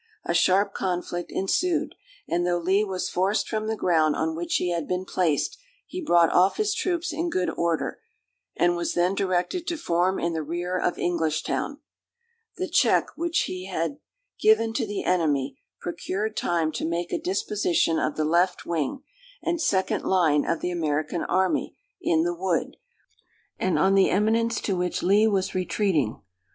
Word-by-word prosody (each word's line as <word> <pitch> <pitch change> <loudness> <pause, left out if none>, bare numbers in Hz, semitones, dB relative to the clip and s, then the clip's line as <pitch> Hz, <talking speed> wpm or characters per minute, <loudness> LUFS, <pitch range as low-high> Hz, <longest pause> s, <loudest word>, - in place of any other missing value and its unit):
A - - 0
sharp 195 +4 +3
conflict 175 -1 -3
ensued; 335 - 0 0.3
and 175 +1 0
though 175 0 +1
Lee 190 +4 +2
was 190 -3 -2
forced 195 +4 0
from 215 -1 -2
the 220 - 0
ground 160 -6 +2
on 160 0 -1
which 170 +1 -2
he 180 - +1
had 170 -3 -2
been 180 +1 -2
placed, 180 - 0 0.3
he 365 - -6
brought 170 - +4
off 185 +2 +4
his 425 -1 +1
troops 350 -3 -1
in 335 +3 -1
good 180 - 0
order, 170 0 -1 0.6
and 175 0 +3
was 175 0 -2
then 175 +2 +2
directed 190 - -1
to 340 - -1
form 180 - +1
in 170 0 -1
the 160 - -2
rear 175 +4 -3
of 180 -1 0
Englishtown. 170 - -1 0.8
The 370 +1 -2
check - - +2
which 340 0 0
he 185 0 -4
had 185 - -2 0.4
given 415 - +4
to 230 -1 -1
the 205 -1 -3
enemy 145 -7 0 0.2
procured 195 +5 -3
time 165 -2 0
to 155 - -4
make 170 +1 -2
a - - -1
disposition 185 -3 +1
of 155 - -1
the 155 - 0
left 175 +4 +1
wing, 170 - -2 0.4
and 340 -1 -1
second 190 - +1
line 160 -6 +3
of 165 - -1
the 180 - -1
American 155 -1 -1
army, 185 0 0 0.2
in 160 - +2
the 175 +1 0
wood, 175 -1 -1 0.8
and 185 - +1
on 190 +1 +3
the 195 -1 +5
eminence 225 +3 +1
to 195 - -1
which 180 0 -2
Lee 205 +4 +4
was 195 -3 0
retreating. 185 - 0
180 Hz, 170 wpm, -25 LUFS, 170-205 Hz, 0.8 s, the